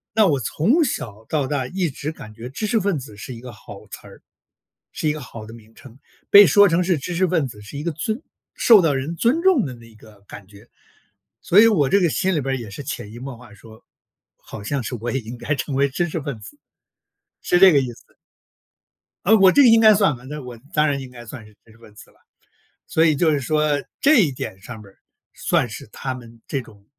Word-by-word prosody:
那 220 -2 +5
我 145 -6 +1
从 225 - +1
小 110 - -5
到 145 -4 -1
大 130 -2 -2
一 180 +1 -2
直 145 +3 -5
感 110 -7 -12
觉 115 +2 -9
知 215 +11 -4
识 220 +1 +1
分 190 -6 -1
子 115 -6 -11
是 125 +4 -8
一 115 - -11
个 125 0 -10
好 110 - -13
词 - - -11
儿， - - -16 0.7
是 155 - -2
一 - - +2
个 155 - -7
好 115 -4 -10
的 110 - -12
名 110 -1 -17
称。 130 -2 -16 0.3
被 200 -1 +9
说 205 +5 +6
成 170 +2 +1
是 175 -4 +1
知 175 +6 -5
识 185 +2 +2
分 160 -5 0
子， 105 -3 -12
是 115 +7 -9
一 145 - -5
个 170 - -2
尊 220 - -4 0.3
受 225 -5 +6
到 150 -4 +2
人 135 +5 -3
尊 265 - +1
重 370 - +3
的 130 - -7
那 115 -1 -16
个 105 -2 -19
感 100 -1 -11
觉。 105 +3 -18 0.7
所 195 +4 +5
以 225 - +7
我 155 -11 +2
这 200 - +3
个 175 -4 +2
心 190 +4 0
里 150 - 0
边 135 0 -2
儿 - - -3
也 110 -4 -9
是 140 - -8
潜 120 -6 -6
移 120 - -10
默 130 -1 -8
化 115 -3 -16
说， 110 +2 -17 0.5
好 - - -11
像 135 +4 -2
是 120 - -5
我 120 +2 -5
也 135 - -1
应 115 +2 -9
该 145 +4 -2
成 140 0 -4
为 140 +1 +2
知 175 +6 -2
识 160 - -4
分 140 -6 -6
子。 290 - -13 0.8
是 175 - +2
这 190 -2 +8
个 140 - +4
意 125 -2 -4
思。 - - -21 1.1
啊， 215 +4 +5
我 195 -3 +6
这 285 - +6
个 250 - +6
应 225 0 +6
该 215 -1 +7
算 195 - +2
吧， 120 - -16
那 150 +1 -6
我 125 -2 -10
当 150 0 +2
然 140 -2 -1
应 130 -1 -9
该 120 -1 -12
算 115 -1 -10
是 105 - -18
知 110 - -20
识 110 - -22
分 110 -2 -18
子 - - -15
了。 - - -29 0.7
所 160 +1 +2
以 155 - +3
就 160 +2 +2
是 145 - 0
说 150 +1 0 0.2
这 300 +1 +5
一 150 -6 +1
点 95 -6 -7
上 120 +2 -9
面 105 - -14
儿， - - -32 0.4
算 125 - 0
是 110 - -9
他 130 +4 -5
们 115 -2 -13
这 135 -3 -3
种 100 -4 -18
140 Hz, 270 characters per minute, -21 LUFS, 115-175 Hz, 1.1 s, 被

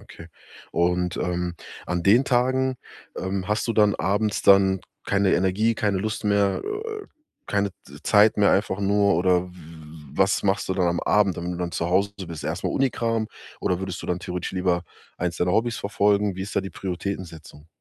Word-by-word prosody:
Okay, 85 +1 -13 0.4
und, 90 0 +1
ähm, 90 -1 -2 0.3
an 90 0 -1
den 115 +8 +5
Tagen, 130 +1 +1 0.4
ähm, 95 0 -3
hast 105 +3 0
du - - +2
dann 105 -2 +4
abends 105 +4 0
dann 95 -1 +5 0.2
keine 100 -1 +2
Energie, 100 +5 +2
keine 100 -3 0
Lust 110 +2 -3
mehr, 100 -1 +2
äh, 425 0 -5 0.4
keine 100 -1 0
Z 70 +2 -14
Zeit 105 +1 +5
mehr 100 - +5
einfach 95 0 0
nur, 100 0 +3
oder 90 0 +2
w - - -17 0.6
was 95 0 +2
machst 95 -1 0
du 95 - 0
dann 90 -2 +2
am 85 0 0
Abend, 100 -4 +2
wenn 85 +1 -3
du - - -5
dann 90 -1 -3
zu 85 +1 -2
Hause 100 +3 +2 0.2
bist 85 -2 -7
erstmal - - -2
Unikram 115 -4 0 0.3
oder 90 -1 0
würdest 95 -1 -5
du - - -7
dann 90 0 -1
theoretisch 90 -1 -4
lieber 90 -2 0 0.3
eins 85 0 -2
deiner 90 0 +1
Hobbys 115 +2 +1
verfolgen? 100 0 +1
Wie 95 - -3
ist 100 - -7
da - - +2
die 95 - -6
Prioritätensetzung? 90 -5 -6
95 Hz, 185 wpm, -24 LUFS, 90-105 Hz, 0.6 s, den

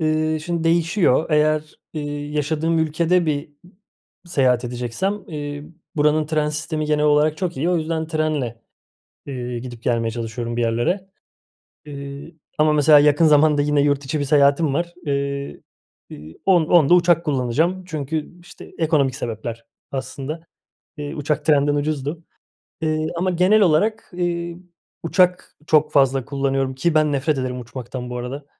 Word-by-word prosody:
Iıı, 155 0 0
şimdi 170 +1 -3
değişiyor. 165 -2 +2
Eğer, 155 0 +1 0.2
ııı, 150 - -3
yaşadığım 150 +3 -1
ülkede 165 +3 +1
bir 145 -1 -2 0.8
seyahat 130 -7 +2
edeceksem, 125 - -3
eee, 145 -2 -6 0.3
buranın 150 +1 +2
tren 155 -1 0
sistemi 155 +1 -3
genel 150 0 +1
olarak 150 +1 +3
çok 175 -3 -3
iyi. 165 +6 0
O 180 - +2
yüzden 160 0 -2
trenle, 150 -8 -2 0.7
ııı, 125 -3 -4
gidip 120 -1 -9
gelmeye 115 -2 0
çalışıyorum 115 +1 -4
bir 120 - 0
yerlere, 120 - 0 0.8
ııı, 140 +2 -8 0.3
ama 155 0 +4
mesela 150 0 +6
yakın 150 +2 +4
zamanda 150 -1 +4
yine 145 0 +2
yurt 145 -1 +1
içi 145 +3 -2
bir 145 - 0
seyahatim 140 +1 +3
var. 170 +1 -2
Iıı, 140 0 -3 0.5
ııı, 75 +2 -11
on 180 -4 +5
onda 170 -1 +5
uçak 175 -1 +3
kullanacağım. 150 +7 0
Çünkü, 155 +1 -5
işte, 175 - -14
ekonomik 150 -5 +2
sebepler 115 -1 -5 0.3
aslında. 140 +3 -5 0.6
Iıı, 145 -1 -5
uçak 150 0 -2
trenden 145 -1 +3
ucuzdu. 145 +2 -2 0.6
Iıı, 155 0 0
ama 185 +2 0
genel 185 +5 +4
olarak, 205 +7 +2
ııı, 170 -1 -2 0.5
uçak 180 +2 +1
çok 155 -1 +3
fazla 135 -2 +3
kullanıyorum 135 -1 -1
ki 165 +5 0
ben 155 -1 +3
nefret 140 +1 0
ederim 125 -1 -3
uçmaktan 125 +1 -7
bu 125 - -4
arada. 135 +4 -6
150 Hz, 145 wpm, -21 LUFS, 135-160 Hz, 0.8 s, mesela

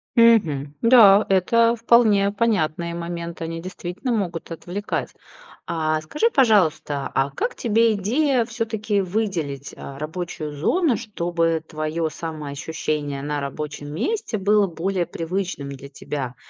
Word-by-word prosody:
Мгм. 165 - +4
Да, 220 -4 +7
это 230 +5 +3
вполне 220 -4 +4
понятные 170 -7 0
моменты, 170 -1 -5
они 165 0 -4
действительно 185 +6 -5
могут 175 -6 -3
отвлекать. 180 +5 -4 0.5
А 155 -1 0
скажи, 300 - 0
пожалуйста, 180 - +2
а 135 +1 +1
как 145 - -2
тебе 230 -1 +2
идея 245 +5 +1
всё-таки 220 -3 -1
выделить, 175 -8 -3
а, 140 0 -9
рабочую 155 -1 -5
зону, 285 - +2
чтобы 170 -5 -1
твое 155 +1 -2
самоощущение 150 -2 -4
на 145 0 -2
рабочем 145 +1 -5
месте 260 - -2
было 205 +1 +3
более 180 +1 -2
привычным 170 -4 -4
для 140 0 -9
тебя? 135 -2 -5
175 Hz, 120 wpm, -23 LUFS, 155-220 Hz, 0.5 s, Да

